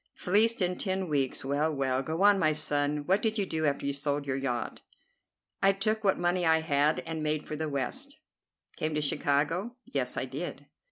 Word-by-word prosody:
Fleeced 210 +3 +3
in 180 0 -1
ten 190 -1 -1
weeks! 140 -4 -1
Well, 145 +3 +1
well! 135 -2 0
Go 160 +6 -2
on, 205 -1 +6
my 155 -3 +3
son. 150 -1 0
What 190 +5 +2
did 220 0 0
you 200 - +1
do 160 -3 -1
after 140 0 -1
you'd 140 0 -1
sold 145 0 -1
your 135 -1 -1
yacht?" 130 -3 -3 0.8
"I 195 0 +5
took 215 +3 -1
what 195 -2 +3
money 175 +1 +1
I 160 -1 +4
had 150 0 +2
and 160 -1 -5
made 155 0 -1
for 155 - -4
the 155 0 -3
West." 260 - -3 0.6
"Came 155 0 -2
to 150 - +1
Chicago?" 150 - 0
"Yes, 125 -3 -2
I - - -1
did." 140 +2 -6
155 Hz, 200 wpm, -29 LUFS, 140-185 Hz, 0.8 s, on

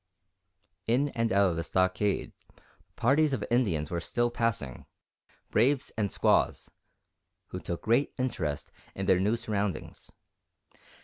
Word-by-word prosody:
In 130 +6 +2
and 115 -3 -1
out 100 -1 +4
of 85 - -4
the 85 - -1
stockade, 95 +3 0 0.6
parties 140 +4 +3
of 120 - -1
Indians 90 - +1
were 85 -1 -1
still 120 +6 0
passing, 115 - -2 0.6
braves 130 +4 +2
and 105 -3 -1
squaws, - - +1 0.8
who - - -5
took 85 - -5
great 120 +6 +2
interest 80 - -2 0.2
in 95 - -3
their 95 -1 +4
new 105 +4 +2
surroundings. 105 -3 -3
105 Hz, 125 wpm, -29 LUFS, 95-120 Hz, 0.8 s, out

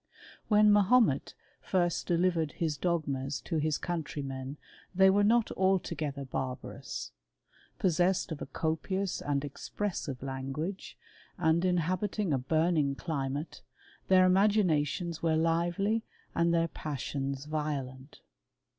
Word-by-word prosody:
When 210 -1 +6
Mahomet 205 - +3 0.3
first 175 -3 0
delivered 170 -3 +1
his 160 -3 -1
dogmas 140 -4 -1
to 160 -4 -2 0.2
countrymen 145 -5 -4 0.4
they 190 +1 +6
were 205 +1 +3
not 230 +2 +3
altogether 160 -7 0
barbarous. 130 -1 -5 0.7
P< - - +1
sessed 175 +1 +1
of 155 - -5
a - - -5
copious 180 +4 -2
and 145 0 -1
expressive 145 -3 -4
language, 135 +8 -5 0.4
and 160 +2 +2
habiting 185 +1 0
a 135 - +1
burning 155 +1 +1
climate, 140 -1 -4 0.5
their 185 -1 +6
imaginations 180 -4 +2
w< 160 -1 +1
lively 175 +7 +1 0.3
and 170 0 +2
their 165 0 +2
passions 140 -2 -4
violent. 145 -3 -4
165 Hz, 110 wpm, -30 LUFS, 140-185 Hz, 0.7 s, When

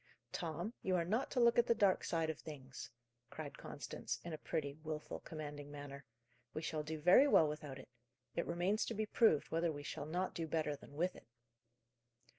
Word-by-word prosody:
"Tom, 175 +6 -3
you 185 -1 +1
are 170 -2 +2
not 220 +9 +1
to 255 - 0
look 235 0 +6
at 240 - +4
the 235 - +4
dark 200 -4 +4
side 165 -1 +1
of 155 - -10
things," 135 -4 -8 0.4
cried - - -7
Constance, - - -4
in 170 - -4
a - - -3
pretty, 145 -4 -2
wilful, 155 -1 -4
commanding 145 -2 -6
manner. 145 -1 -8 0.5
"We 155 - -2
shall 155 0 -1
do 155 +1 -4
very 180 - +8
well 160 - +7
without 150 -2 -5
it: - - -10 0.5
it 170 - 0
remains 180 +5 +1
to 230 - -3
be 215 +1 0
proved 210 - +4
whether 165 +1 +2
we 145 -1 -6
shall 145 - -4
not 180 +4 -1
do 165 -1 -2
better 155 -1 0
than 140 0 -14
with 180 +4 +1
it." - - -14
160 Hz, 200 wpm, -38 LUFS, 150-185 Hz, 0.5 s, very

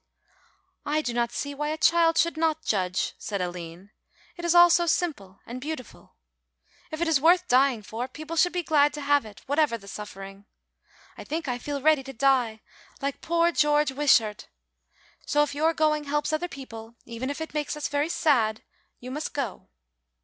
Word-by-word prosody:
"I 305 +1 0
do 240 - -2
not 235 0 0
see 285 +3 -4
why 295 +1 -3
a 310 - -2
child 330 0 +4
should 335 0 +2
not 315 0 0
judge," 185 -3 0
said 200 -2 -4
Aline; 175 +1 -6 0.4
"it 345 - -9
is 345 0 +2
all 345 0 +8
so 345 0 +3
simple 240 - -2
and 250 +2 -7
beautiful. 290 -5 -8 0.7
If 315 +1 -6
it 340 - +1
is 310 -4 +2
worth 355 +3 +4
dying 255 -3 +3
for, 230 +5 -5
people 310 +5 -8
should 355 +2 +3
be 355 0 -2
glad 295 -2 +3
to 295 - -6
have 285 -4 +2
it, 205 - -14
whatever 285 -4 +1
the 200 -3 -16
suffering. 195 -1 -9 0.7
I - - -7
think 320 0 -4
I 245 -1 -2
feel 280 +1 -5
ready 310 -2 +4
to 270 0 -9
die 245 -4 +1 0.4
like 280 0 -3
poor 340 +1 +2
George 295 -2 +2
Wishart. 245 -7 +2 0.8
So 295 0 +3
if 295 - -3
your 310 +3 +2
going 305 -2 +1
helps 295 +2 -1
other 325 +3 -1
people, 230 -5 -10
even 235 +3 -5
if 285 - -4
it 320 - -6
makes 300 0 -2
us 300 - -2
very 290 +2 -1
sad 230 -10 +1 0.4
you 250 +1 -8
must 300 +3 -5
go. 260 -9 -4
285 Hz, 185 wpm, -26 LUFS, 235-315 Hz, 0.8 s, all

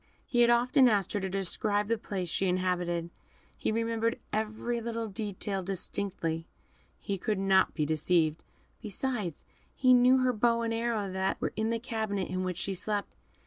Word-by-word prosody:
He 240 - +2
had 235 - +6
often 250 +2 +5
asked 200 -4 +1
her 205 - +1
to 190 -1 -3
describe 205 +2 -1
the 230 - +2
place 195 -4 -4
she 190 +3 0
inhabited. 180 -2 0 0.4
He - - -1
remembered 230 +1 0 0.2
every 220 +2 -1
little 230 0 -3
detail 200 -2 -3
distinctly. 175 -3 -3 0.5
He 195 -1 -4
could 210 +2 -1
not 190 -1 +3
be 150 - +1
deceived; 155 +1 +1 0.4
besides, 215 - -3 0.3
he 255 -1 +5
knew 250 +1 +6
her 255 -1 +2
bow 235 +1 +2
and 230 0 -1
arrow 225 -4 -1
that 190 +1 -1
were - - -2
in 220 +1 0
the 230 - +1
cabinet 220 -5 -2
in 185 0 -2
which 180 -2 -3
she 195 - -2
slept. 205 +2 -2
205 Hz, 170 wpm, -30 LUFS, 185-230 Hz, 0.5 s, had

